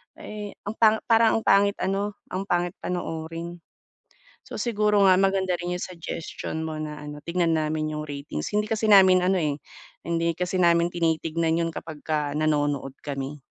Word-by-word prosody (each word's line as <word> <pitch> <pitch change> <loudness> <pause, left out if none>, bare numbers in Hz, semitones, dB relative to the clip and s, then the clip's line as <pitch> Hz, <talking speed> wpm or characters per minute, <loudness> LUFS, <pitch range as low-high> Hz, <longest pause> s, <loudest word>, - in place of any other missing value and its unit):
eh, 210 -1 -8
ang 205 - -3
pang 220 -1 +6 0.2
parang 225 0 +5
ang - - -15
pangit 200 +1 +4
ano, 200 +2 -1 0.2
ang 195 +2 -3
pangit 175 0 +1
panoorin. 165 0 -5 0.8
So, - - -8
siguro 210 -3 +2
nga, 185 - +7
maganda 190 -1 +2
rin 175 +1 -4
'yung - - -9
suggestion 165 -2 -5
mo 160 - -4
na 150 -1 -5
ano, 150 0 -8
tignan 170 -1 +1
namin 155 0 -1
'yung 150 - -4
ratings. 140 - -5
Hindi 210 +1 0
kasi 220 0 +1
namin 185 -2 +7
ano, 185 0 +2
eh, 150 -3 0 0.5
hindi 170 0 0
kasi 180 +1 -2
namin 170 0 +4
tinitignan 165 -1 0
'yon 165 - -2
kapag 155 -1 -8
ka 150 -2 -1
nanonood 145 -3 0
kami. 140 0 -5
170 Hz, 170 wpm, -25 LUFS, 155-195 Hz, 0.8 s, nga